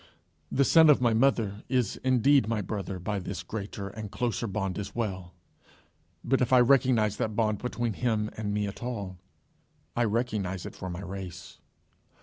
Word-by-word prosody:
The 140 Hz, -, +3 dB
son 160 Hz, +1 st, +7 dB
of 150 Hz, -, +6 dB
my 120 Hz, -2 st, +3 dB
mother 110 Hz, -4 st, +2 dB
is 125 Hz, -4 st, +1 dB
indeed 130 Hz, 0 st, +4 dB
my 115 Hz, -1 st, 0 dB
brother 100 Hz, -2 st, -4 dB
by 100 Hz, +3 st, -3 dB
this 90 Hz, -, -5 dB
greater 100 Hz, -2 st, -5 dB
and 105 Hz, +1 st, -7 dB
closer 115 Hz, +1 st, -2 dB
bond 95 Hz, -1 st, -2 dB
as 100 Hz, -, -6 dB
well; 95 Hz, -6 st, -3 dB, 0.9 s
but 135 Hz, -, +1 dB
if 125 Hz, -, +1 dB
I 130 Hz, -, +7 dB
recognize 120 Hz, -4 st, +4 dB
that 110 Hz, -1 st, -2 dB
bond 110 Hz, -2 st, +1 dB
between 120 Hz, -2 st, -2 dB
him 110 Hz, -2 st, -1 dB
and 105 Hz, -1 st, -3 dB
me 105 Hz, 0 st, 0 dB
at 100 Hz, -, -7 dB
all, 100 Hz, -7 st, -5 dB, 0.8 s
I 120 Hz, -, +2 dB
recognize 105 Hz, -5 st, -1 dB
it -, -, -7 dB
for 95 Hz, -, -6 dB
my 90 Hz, +1 st, -5 dB
race. 95 Hz, -1 st, -8 dB
110 Hz, 170 wpm, -28 LUFS, 100-120 Hz, 0.9 s, son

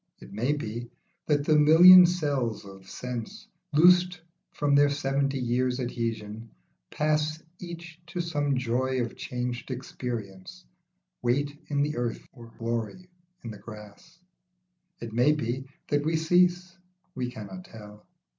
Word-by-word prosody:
It -, -, -13 dB
may 120 Hz, +8 st, 0 dB
be, 120 Hz, -4 st, -5 dB, 0.4 s
that 145 Hz, -2 st, +1 dB
the 155 Hz, -, +4 dB
million 175 Hz, +4 st, +9 dB
cells 140 Hz, -, -2 dB
of 95 Hz, -1 st, -13 dB
sense, 125 Hz, -3 st, -6 dB, 0.3 s
Loosed 180 Hz, +3 st, +5 dB, 0.3 s
from 145 Hz, -1 st, -1 dB
their 145 Hz, 0 st, +5 dB
seventy 140 Hz, -1 st, -1 dB
years' 125 Hz, +1 st, 0 dB
adhesion, 115 Hz, -3 st, -4 dB, 0.4 s
pass 155 Hz, 0 st, 0 dB, 0.2 s
Each 170 Hz, -1 st, -9 dB
to 175 Hz, +1 st, -6 dB
some 145 Hz, -5 st, -1 dB
joy 130 Hz, +1 st, -1 dB
of 115 Hz, -, -6 dB
changed 125 Hz, 0 st, -5 dB
experience, 115 Hz, -, -6 dB, 0.6 s
Weight 140 Hz, +4 st, 0 dB
in 145 Hz, -1 st, 0 dB
the 150 Hz, -1 st, -2 dB
earth 120 Hz, -1 st, -3 dB
or 120 Hz, -3 st, -13 dB
glory 115 Hz, -, -4 dB, 0.3 s
in 115 Hz, -, -6 dB
the 105 Hz, -, -10 dB
grass. 105 Hz, +9 st, -13 dB, 0.8 s
It 115 Hz, -2 st, -7 dB
may 125 Hz, +6 st, +4 dB
be, 130 Hz, -2 st, -3 dB, 0.2 s
that 145 Hz, 0 st, +1 dB
we 160 Hz, +2 st, 0 dB
cease; 180 Hz, +3 st, +2 dB, 0.4 s
we 125 Hz, -1 st, -3 dB
cannot 100 Hz, -6 st, -9 dB
tell. 105 Hz, -1 st, -13 dB
130 Hz, 135 wpm, -27 LUFS, 115-155 Hz, 0.8 s, million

